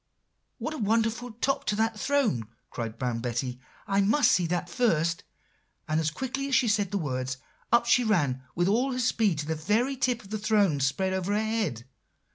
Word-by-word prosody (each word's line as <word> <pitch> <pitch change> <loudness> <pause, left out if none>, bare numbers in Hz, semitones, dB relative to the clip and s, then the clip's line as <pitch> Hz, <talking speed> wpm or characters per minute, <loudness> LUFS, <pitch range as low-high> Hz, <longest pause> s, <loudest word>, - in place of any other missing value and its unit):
"'What 310 - -4
a 310 - -6
wonderful 225 +3 0
top 265 +5 -1
to 210 - 0
that 220 0 0
throne!' 265 - +1 0.2
cried 115 -2 -5
Brown 120 -2 -2
Betty; 125 +1 -3 0.3
'I 200 0 +2
must 235 +6 +4
see 175 -2 +2
that 175 +1 -1
first;' 170 -5 +1 0.6
and 155 0 +1
as 155 -1 +1
quickly 265 - -3
as 275 - +1
she 260 -3 +3
said 205 -3 +1
the 200 - -1
words, 130 -5 -3 0.3
up 235 0 +5
she 245 - +4
ran 145 - +1
with 175 +1 +1
all 250 +5 +1
speed 225 -7 +1
to 150 - -3
the 160 - -1
very 215 - 0
tip 250 -2 0
of 195 - -15
the 215 - -2
throne 205 -8 +2
spread 190 +8 0
over 190 +2 -1
her - - +2
head. 210 - -2
200 Hz, 195 wpm, -27 LUFS, 155-235 Hz, 0.6 s, up